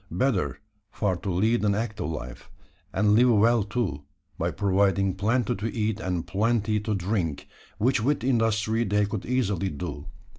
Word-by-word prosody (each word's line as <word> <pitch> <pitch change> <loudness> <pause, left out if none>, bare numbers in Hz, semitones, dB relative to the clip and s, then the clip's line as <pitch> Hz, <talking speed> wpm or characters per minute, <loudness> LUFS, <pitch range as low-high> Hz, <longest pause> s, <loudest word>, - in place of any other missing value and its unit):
Better 95 - 0 0.3
far 100 -3 -1
to 95 - -5
lead 110 +6 +1
an 100 -1 +2
active 105 -6 -3
life; 65 -6 -7 0.4
and 105 -1 +2
live 125 +4 +5
well 115 +1 +4
too 100 - -2 0.3
by - - -1
providing 100 -1 +1
plenty 110 +4 +1
to 105 +4 -3
eat 110 -2 -1
and 90 -5 -2
plenty 110 +3 +1
to 105 0 -2
drink 90 -5 -2 0.3
which 120 +1 +2
with 135 0 0
industry 115 -2 +1
they 105 -1 +1
could 100 -1 -5
easily 100 -7 0
do. 75 -2 -6
105 Hz, 155 wpm, -26 LUFS, 95-115 Hz, 0.4 s, live